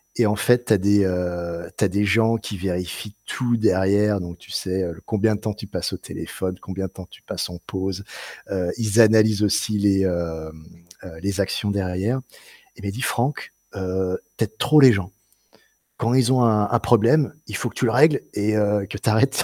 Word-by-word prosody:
et 120 - +3
en 105 - +1
fait, 120 +2 +3
tu 110 - +3
as - - +5
des, 100 +1 +3
heu, 85 -2 -3
tu - - +1
as - - +4
des 100 +2 0
gens 115 +3 +3
qui 105 - -6
vérifient 90 +2 -4
tout 120 -2 -1
derrière, 100 -1 +2
donc 85 0 -7
tu - - -14
sais, 95 0 -2
heu, 85 - -3
l 80 - -12
combien 110 0 +1
de 105 - -8
temps 110 -2 -2
tu 105 0 -10
passes 100 - -3
au - - -3
téléphone, 95 -1 -6
combien 95 0 -5
de - - -17
temps 95 -2 -11
tu - - -15
passes - - -4
en 90 - -8
pause. 95 -3 -4 0.5
Heu, 90 -2 -1
ils 110 -1 +1
analysent 110 -1 +4
aussi 105 +1 +1
les, 100 -1 +3
hem, 80 -3 -3 0.4
heu, 80 -3 -10
les 100 0 -1
actions 100 +1 -1
derrière. 100 +5 -1 0.6
Il - - -13
m'a 100 - -2
dit: 120 +6 -6
«Franck, 130 0 -1 0.2
heu, 95 -1 -2 0.2
tu - - +1
aides 110 +1 -16
trop 150 +5 +4
les 130 -2 +9
gens. 95 -3 -2 0.9
Quand 115 +2 0
ils 130 -1 +3
ont 125 -1 +3
un 105 -2 +3
un 120 - +3
problème, 120 +6 +3
il - - -5
faut - - -2
que - - -18
tu - - -3
le 115 - +2
règles 145 +4 +4
et 105 +1 0
heu, 105 -1 +1
que 100 - -5
tu 110 - -1
arrêtes 135 +6 +2
100 Hz, 220 wpm, -22 LUFS, 95-115 Hz, 0.9 s, les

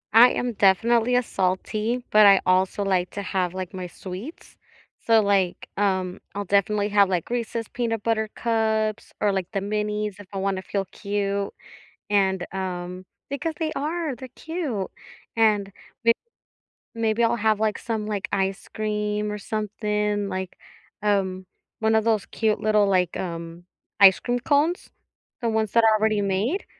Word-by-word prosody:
I 240 +2 +9
am 245 -1 -2
definitely 230 +5 +3
a 250 - +3
salty, 215 +6 -1
but 210 -1 +7
I 195 -1 +7
also 185 +2 +2
like 185 -2 +1
to 200 - -5
have, 185 -2 -1
like, 185 -1 -5
my 185 -1 -5
sweets, 190 - -9 0.5
so, 225 -1 +6
like, 195 -3 +1
um, 190 -3 0 0.2
I'll 205 0 -3
definitely 200 +2 +2
have, 200 -2 +4
like, 180 -3 -1
Reese's 230 -2 -2
Peanut 225 -3 -2
Butter 220 -1 0
Cups, 220 -2 0
or 205 -1 +2
like 190 -1 -3
the 200 - -1
minis 210 0 -2
if 200 - -11
I 195 - -5
wanna 190 -1 -1
feel 195 0 -2
cute, 200 +1 -2 0.6
and 190 -3 +2
um 185 -1 -4 0.2
Because 310 +3 -3
they 315 -1 -1
are, 310 -1 -2
they're 260 +2 -9
cute, 305 - -4 0.4
and 210 -3 +2 0.3
m 230 - +7 0.8
maybe 230 0 +1
I'll 230 - +3
have, 220 -2 +1
like, 215 -1 0
some, 220 -2 -3
like, 205 -2 -3
ice 195 +1 -1
cream 210 -1 -2
or 210 - -3
something 210 -1 -2
like, 185 -1 -4 0.5
um, 190 -3 0 0.3
one 220 0 +2
of 220 - +3
those 220 -3 +1
cute 215 -2 0
little, 215 -1 +3
like, 180 -3 +1
um, 170 -1 -6 0.3
ice 195 -2 +8
cream 245 0 -1
cones. 295 +7 +1 0.5
The 235 - 0
ones 220 -2 0
that 230 - +4
are 220 -1 +5
already 215 -1 +2
made, 200 - 0
210 Hz, 160 wpm, -24 LUFS, 190-225 Hz, 0.8 s, I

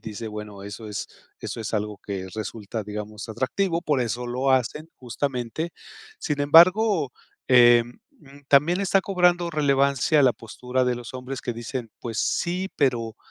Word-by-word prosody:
dice, 110 +1 -6
bueno, 105 -2 -8
eso 100 +2 -8
es 105 -1 -4 0.3
eso - - -5
es 110 - -5
algo 105 -1 -2
que 95 -2 -5
resulta, 110 0 -5
digamos 105 +2 -7
atractivo, 165 - -1
por 150 -6 0
eso 120 +1 -3
lo 130 +3 0
hacen 130 +5 0
justamente, 130 +4 -3 0.5
sin 150 -2 -2
embargo, 170 - +5 0.4
em, 120 -1 +5 0.5
también 150 +7 +4
está 195 0 +2
cobrando 180 -2 +2
relevancia 140 -2 +2
la 130 -2 +5
postura 125 +3 -3
de 125 -1 0
los 120 +1 -9
hombres 130 +1 -6
que 120 - -3
dicen, 120 0 -5
pues 115 -2 -5
sí, 180 +2 -1
pero 120 -5 0
125 Hz, 150 wpm, -24 LUFS, 110-150 Hz, 0.5 s, embargo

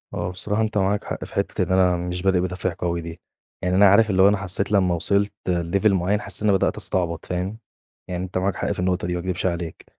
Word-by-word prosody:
هُو 85 +1 -2
بصراحة 105 +4 -1
أنت 110 -1 -1
معاك 100 +1 +1
حق - - -5
في - - -14
حِتّة - - -1
إن 95 - -4
أنا 95 -1 +4
مش 90 +1 -3
بادئ 95 -1 +2
بدافع 90 0 -2
قوي 85 -1 -1
دي، 85 0 -9 0.4
يعني 90 0 +1
أنا 100 +1 +7
عارف 105 +3 +5
اللي 95 -1 +3
هو 95 - +8
أنا 105 0 +3
حسيت 95 +1 -3
لمّا 95 -3 +3
وِصلت 100 +4 +1 0.2
لLevel 90 +4 +1
معيّن 95 +2 +1
حسيت 100 +2 -2
إن 105 - +3
أنا 100 - +4
بدأت - - 0
أستعبط، 85 -3 -2
فاهم، 90 +4 -3 0.5
يعني 90 0 -3
أنت 95 0 -4
معاك 95 0 0
حق - - -2
في - - -4
النقطة 90 -1 0
دي 90 - -2
ما 90 - -2
أكدبش 90 +1 -2
عليك، 85 -2 -3
95 Hz, 245 wpm, -23 LUFS, 90-100 Hz, 0.5 s, هو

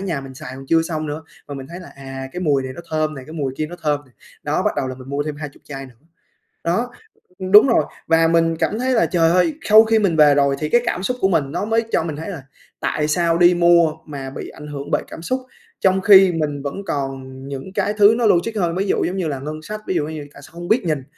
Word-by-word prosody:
nhà 160 -6 -2
mình 135 -1 -10
xài 130 -1 -8
còn 135 0 -10
chưa 165 0 +4
xong 155 -2 -3
nữa, 150 +2 -5 0.3
mà 140 - -6
mình 135 -1 -7
thấy 175 +2 -8
là 180 - -11
"À, 135 -1 -7
cái 180 - -5
mùi 145 -6 +1
này 130 0 -6
nó - - -8
thơm 155 -1 0
này, 130 -1 -9
cái 155 - -10
mùi 140 -5 -3
kia 155 - -2
nó 175 +2 -9
thơm 150 -2 +1
này" 130 - -26 0.3
đó, - - 0
bắt - - +2
đầu 130 - -1
là 130 - -5
mình 130 +1 -12
mua 140 +1 -1
thêm 150 -1 -5
20 150 -2 -8
chai 135 -2 -7
nữa. 125 - -17 0.7
Đó, 230 +9 0 0.6
đúng 210 +6 +9
rồi. 235 - +3 0.2
Và 165 0 +4
mình 165 0 +2
cảm 215 +6 -1
thấy 255 +1 0
là, 225 - +3
trời 165 -2 +2
ơi! 175 -3 +2
Khau 215 +1 +8
khi 225 0 +3
mình 190 -6 +1
về 150 -2 +6
rồi 140 -1 +2
thì 150 - -2
cái 240 - +4
cảm 185 - -2
xúc 250 +5 -1
của 190 - +3
mình 155 -7 +1
nó - - -2
mới 225 +1 +1
cho - - +2
mình 155 -3 -4
thấy 160 +5 -6
là 160 -8 -7 0.4
"Tại 150 0 -1
sao 170 +1 +1
đi 175 0 +6
mua 170 -2 +4
mà 135 -3 -6
bị - - -7
ảnh 150 - -11
hưởng 145 -1 -7
bởi - - +1
cảm 165 - -9
xúc? 255 +8 -1 0.4
Trong 190 0 +3
khi 190 -1 +7
mình 145 -3 -2
vẫn 140 - -4
còn 135 -2 -3 0.3
những 140 +7 -7
cái 205 - 0
thứ 210 +2 +7
nó 235 - +2
logic 205 +4 +2
hơn, 175 -3 0
ví 195 +2 0
dụ - - +1
giống 185 - -2
như 180 -4 -1
là 140 - -3
ngân 155 +2 -6
sách, 215 +5 -6
ví - - -1
dụ 150 -4 0
như 155 -2 -6
tại 140 - -13
sao 145 - -15
không 175 +1 -8
biết 235 0 +2
nhìn." 150 -5 -1
160 Hz, 280 wpm, -20 LUFS, 140-180 Hz, 0.7 s, đúng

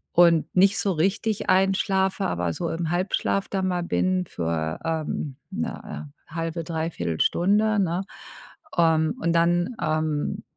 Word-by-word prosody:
Und 170 -2 +6
nicht 195 +3 +5
so 195 - +1
richtig 195 +6 0
einschlafe, 190 0 +2
aber 85 - -1
so 170 - -3
im 165 0 -2
Halbschlaf 185 +2 0
da 195 - -1
mal 180 -2 0
bin 185 +1 +1
für, 80 - -3
ähm, 155 -3 -2 0.2
'ne, 200 -4 -5 0.2
äh, - - -15
1/2, 165 0 -3
3/4 160 - -3
Stunde, 210 +4 +3
ne? 180 +1 -1 0.7
Ähm, 160 +2 +3
und 170 -6 +1
dann, 175 +5 +2
ähm, 155 -1 -1
170 Hz, 135 wpm, -25 LUFS, 160-190 Hz, 0.7 s, Und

